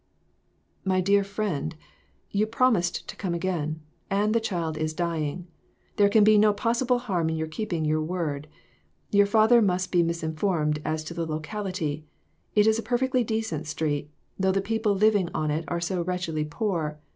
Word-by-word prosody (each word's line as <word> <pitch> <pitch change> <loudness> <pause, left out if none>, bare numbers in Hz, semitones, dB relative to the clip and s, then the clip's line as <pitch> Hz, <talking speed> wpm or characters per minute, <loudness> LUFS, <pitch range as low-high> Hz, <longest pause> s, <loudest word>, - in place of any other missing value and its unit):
"My 190 -1 +1
dear 200 +2 +3
friend, 195 -7 -3 0.6
you 210 +2 +1
promised 220 -7 +1
to - - -7
come 180 -4 -2
again, 160 -3 -2 0.3
and 205 +2 +1
the 230 - +3
child 170 -8 -2
is 155 0 -2
dying! 170 -1 -2 0.5
There 205 -1 +5
can 210 +1 +5
be 215 0 +6
no 210 0 +4
possi 235 +4 0
ble 250 -1 +4
harm 185 -9 -1
in 160 - -1
your 160 0 -1
keeping 160 0 -3
your 155 +1 +1
word. 155 -3 -3 0.6
Your 205 0 +5
father 220 +3 +5
must 185 -3 +1
be 175 - +4
misinformed 160 -1 0
as 155 0 -2
to 155 - -7
the 170 -1 -3
locality. 160 -1 -3 0.5
It 210 -1 +5
is 220 0 +3
a - - -4
perfectly 255 +1 +1
decent 220 -9 -2
street, 150 -1 -2 0.3
though 190 0 +3
the 195 - +1
people 215 +1 0
living 205 -3 +3
on 155 -1 0
it 160 +2 -2
are 170 - -1
so 175 +1 -1
wretchedly 170 -3 -2
poor. 155 -2 -2
180 Hz, 175 wpm, -26 LUFS, 160-210 Hz, 0.6 s, be